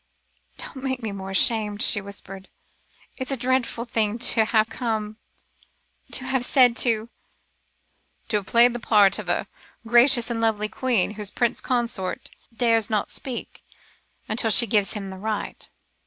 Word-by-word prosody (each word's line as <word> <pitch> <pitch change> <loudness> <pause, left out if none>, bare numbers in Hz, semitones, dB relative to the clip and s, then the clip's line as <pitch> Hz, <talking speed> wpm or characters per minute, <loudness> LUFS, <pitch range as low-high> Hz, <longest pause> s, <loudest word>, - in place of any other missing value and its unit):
"Don't - - -9
make 260 -2 -3
me 220 - -3
more 195 -1 -7
ashamed," 210 +2 +2
she 205 - +2
whispered. 195 -1 -11 0.7
"It 260 -1 -5
is 270 - 0
dreadful 250 -1 -1
to 225 0 +1
have 220 -1 +2
come 220 -2 -4 1.0
to 255 - +2
have 265 -1 -1
said 245 -2 +4
to 230 -2 +1 0.6
" - - -44
"To 210 - +1
have 200 -2 -6
played 235 +1 +4
the 240 - -5
part 205 -4 +3
of - - -7
a - - -1 0.4
gracious 240 +1 +5
and 225 -1 -3
lovely 215 -2 0
queen, 240 -8 0
whose 210 -1 -5
Prince 240 +1 0
Consort 235 -7 -3 0.2
dares 230 -1 +1
not 215 -2 -1
speak, 255 -3 -7 0.6
until 225 +1 +1
she 235 - +6
gives 210 -4 +1
him 195 -2 -6
the 190 - -9
right?" 215 +1 -5
225 Hz, 155 wpm, -23 LUFS, 210-240 Hz, 1.0 s, she